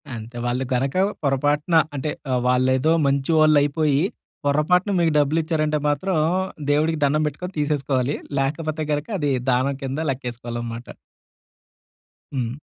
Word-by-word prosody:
అంతే. 115 +2 -8
వాళ్ళు 120 +2 0
గనక 135 +4 0 0.3
పొరపాటున 145 +4 +1 0.2
అంటే, 150 +2 -2 0.2
ఆహ్, 125 -1 +1
వాళ్ళేదో 130 +4 +3
మంచి 140 +2 +1
వాళ్ళయిపోయి, 150 -1 +3 0.4
పొరపాటున 165 +7 +2
మీకు 165 -2 +2
డబ్బులిచ్చారంటే 155 +1 +1
మాత్రం, 165 +5 0 0.5
దేవుడికి 155 +2 +1
దండం 150 +2 +1
బెట్టుకొని, 180 +6 -6
తీసేసుకోవాలి. 145 -2 0 0.2
లేకపోతే 155 +3 -2
గనక 145 +1 -2
అదీ, 145 -2 0 0.2
దానం 130 +3 +1
కింద 135 +2 -3
లెక్కేసుకోవాలనమాట. 120 -2 -6 1.4
హ్మ్. 120 -3 -2
145 Hz, 115 wpm, -22 LUFS, 130-155 Hz, 1.4 s, వాళ్ళేదో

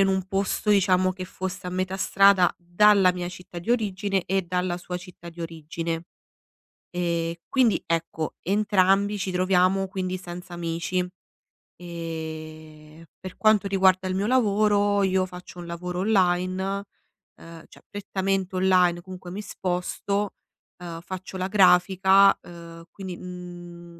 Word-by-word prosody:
in 195 - +5
un 190 -1 0
posto, 195 +1 -1
diciamo, 185 -2 +3
che 185 0 -7
fosse 185 0 -6
a 180 - -3
metà 185 +1 -2
strada 195 -2 +4
dalla 185 +2 +4
mia 175 -1 -4
città 180 -1 -9
di 175 +7 -5
origine 200 -4 0
e 190 +1 +1
dalla 180 0 -1
sua 180 0 -5
città 180 -1 -11
di 170 0 -12
origine. 165 +1 -5 0.9
Ehm, 170 -2 -1 0.2
quindi, 250 -5 +3
ecco, 165 -1 -2
entrambi 200 +1 +2
ci 185 -1 -3
troviamo 185 +1 +2
quindi 185 -1 -3
senza 180 0 -9
amici. 170 +2 -2 0.7
Ehm, 160 -2 -8 0.2
per 185 -1 -9
quanto 215 -2 +3
riguarda 190 -1 +3
il 185 - -2
mio 200 +2 0
lavoro, 205 -4 +3
io 185 0 +2
faccio 180 0 -11
un 175 - -8
lavoro 180 +1 -4
online, 190 0 +1 0.5
ehm, 165 -1 -12
cioè - - -18
prettamente 195 -2 -2
online, 180 -2 +3
comunque 185 -1 -9
mi 205 - -5
sposto, 190 +2 -2 0.4
uhm, 170 -2 -7
faccio 185 +1 -7
la 185 0 -2
grafica, 190 0 +5
uhm, 170 -1 -11
quindi, 185 -2 -7
mhmm, 175 -1 -10
185 Hz, 140 wpm, -25 LUFS, 175-195 Hz, 0.9 s, in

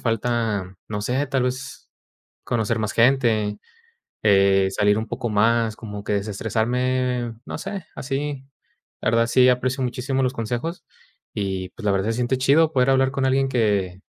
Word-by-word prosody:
falta, 115 -4 -1
no 105 -1 -3
sé, 130 +6 0
tal 135 -2 0
vez, 130 +2 -5 0.5
conocer 115 -1 0
más 110 -1 -2
gente, 115 -4 +2 0.7
eh, 100 -1 +4
salir 105 +1 +2
un 110 - -3
poco 120 - -3
más, 110 +1 +2
como 105 -2 -8
que 105 - -2
desestresarme, 120 +4 -1
no - - -5
sé, 195 +1 -5
así. 140 +1 -3 0.6
La 115 - +1
verdad 115 0 +3
sí 125 +1 +5
aprecio 130 +2 0
muchísimo 130 +2 -1
los 125 - 0
consejos, 120 +9 -4 0.5
y 95 -2 -3
pues, 110 - -11
la 100 - +3
verdad 100 +1 0
se - - +1
siente 125 +2 0
chido 155 +5 +3
poder 125 0 +3
hablar 135 0 +3
con 135 -1 -1
alguien 135 +1 +2
que 100 -6 0
120 Hz, 160 wpm, -23 LUFS, 105-130 Hz, 0.7 s, sí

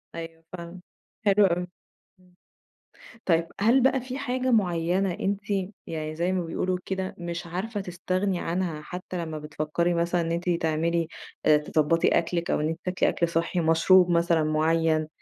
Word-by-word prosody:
أيوه 165 0 -8
فاهمة، 170 +1 -8 0.5
حلو 205 0 +5
أوي. 180 -1 0 0.5
إمم. 180 -1 -25 0.9
طيب، 165 -2 +2
هل 240 +5 +5
بقى 265 -1 +3
في 255 +1 -6
حاجة 255 -2 -1
معيّنة 180 -2 +1
أنتِ 200 +2 -1 0.5
يعني 155 -1 -4
زي 175 +3 0
ما 180 -2 -1
بيقولوا 180 +2 -1
كده 190 -1 -3
مش 175 +1 -5
عارفة 200 +5 -3
تستغني 185 +1 -2
عنها 170 -3 -2
حتّى 180 +1 -5
لمّا 155 -1 -5
بتفكّري 155 +3 -1
مثلًا 170 +1 +1
إن 165 0 -2
أنتِ 175 +1 -1
تعملي 165 0 +1 0.4
آآ 155 -1 +6
تضبّطي 155 +2 +1
أكلِك 170 0 -1
أو - - +1
إن 150 - 0
أنتِ 165 +1 -4
تاكلي 180 0 +1
أكل 170 - 0
صحّي، 170 +2 0
مشروب 170 +3 +5
مثلًا 170 -1 +3
معيّن، 155 0 +2
170 Hz, 160 wpm, -26 LUFS, 165-185 Hz, 0.9 s, آآ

